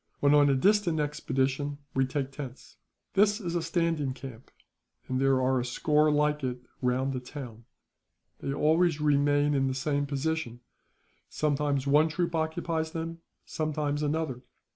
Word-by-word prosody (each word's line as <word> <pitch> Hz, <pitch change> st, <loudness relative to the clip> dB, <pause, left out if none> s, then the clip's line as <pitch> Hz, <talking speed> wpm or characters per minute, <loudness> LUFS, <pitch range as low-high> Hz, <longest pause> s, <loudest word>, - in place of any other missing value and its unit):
When 145 Hz, 0 st, +4 dB
on 145 Hz, -1 st, +6 dB
a 135 Hz, -, +3 dB
distant 190 Hz, +1 st, +3 dB
expedition, 145 Hz, -1 st, -1 dB, 0.2 s
we 135 Hz, 0 st, +2 dB
take 135 Hz, 0 st, -3 dB
tents. 135 Hz, -2 st, -9 dB, 0.4 s
"This 205 Hz, +2 st, +3 dB
is 175 Hz, -5 st, -4 dB
a 175 Hz, -, 0 dB
standing 165 Hz, -5 st, 0 dB
camp, 130 Hz, -3 st, -10 dB, 0.6 s
and 130 Hz, 0 st, -1 dB
there 135 Hz, -1 st, +3 dB
are 130 Hz, 0 st, +2 dB
a -, -, -1 dB
score 150 Hz, +5 st, +2 dB
like 150 Hz, 0 st, +1 dB
it 125 Hz, -1 st, -2 dB, 0.2 s
round 130 Hz, +2 st, 0 dB
the 130 Hz, -, -2 dB
town. 125 Hz, -3 st, -9 dB, 0.7 s
They 140 Hz, -, -3 dB
always 160 Hz, +3 st, +2 dB
remain 145 Hz, 0 st, +3 dB
in 135 Hz, -1 st, +2 dB
the 130 Hz, -, -1 dB
same 145 Hz, +1 st, -1 dB
position; 140 Hz, -4 st, -2 dB, 0.7 s
sometimes 145 Hz, -2 st, 0 dB
one 150 Hz, +3 st, +4 dB
troop 170 Hz, +2 st, -1 dB
occupies 160 Hz, 0 st, -1 dB
them, 165 Hz, 0 st, -4 dB, 0.3 s
sometimes 150 Hz, -2 st, -2 dB
another. 150 Hz, -4 st, -1 dB
145 Hz, 150 wpm, -28 LUFS, 135-160 Hz, 0.7 s, on